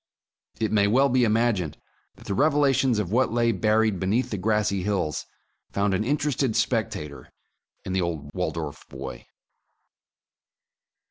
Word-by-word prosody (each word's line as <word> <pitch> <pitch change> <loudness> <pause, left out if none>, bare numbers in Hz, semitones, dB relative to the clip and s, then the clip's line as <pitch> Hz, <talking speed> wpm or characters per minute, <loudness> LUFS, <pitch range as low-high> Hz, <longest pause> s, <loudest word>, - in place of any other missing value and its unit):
It 110 -1 0
may 100 -2 +3
well 135 +6 +4
be 125 -1 +3
imagined 110 -8 +1 0.4
that - - -16
the 100 - -2
revelations 135 -2 +3
of 100 -4 -2
what 125 +2 +2
lay 115 0 +2
buried 110 0 +2
beneath 105 +7 0
the 105 - -2
grassy 105 -1 +1
hills 95 -6 -2 0.4
found 100 0 +1
an 95 - +1
interested 140 -2 0
spectator 105 - -2 0.6
in 95 - -3
the 95 - +1
old 80 -4 -3
Waldorf 80 -5 -4
boy. - - -8
105 Hz, 135 wpm, -25 LUFS, 95-120 Hz, 0.6 s, well